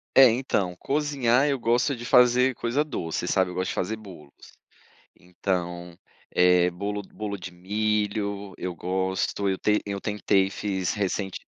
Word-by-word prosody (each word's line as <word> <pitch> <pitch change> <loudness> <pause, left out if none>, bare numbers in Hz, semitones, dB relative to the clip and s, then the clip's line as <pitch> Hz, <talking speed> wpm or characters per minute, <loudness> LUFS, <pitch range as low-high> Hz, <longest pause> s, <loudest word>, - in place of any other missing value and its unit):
É, 130 -3 +9
então, 105 -7 -1
cozinhar 140 -3 +1
eu 140 -2 0
gosto 120 +4 +1
de 120 - -9
fazer 125 +1 +4
coisa 120 +5 0
doce, 90 - -4
sabe, 95 0 +1
eu - - -7
gosto 95 +1 -1
de - - -4
fazer 105 +5 -1
bolos. 90 -9 -13 0.8
Então, 90 -1 -4 0.3
eh, 90 0 +4
bolo 100 +3 -4
bolo 100 +1 -6
de 95 -1 -8
milho, 100 +1 -2
eu 90 -1 -4
gosto, 95 +2 -1
eu 95 -1 0
ten 105 +2 +2
eu 100 -1 -4
tentei 100 -2 +1
fiz 95 -2 -2
recente 100 -1 -2
100 Hz, 150 wpm, -26 LUFS, 90-115 Hz, 0.8 s, É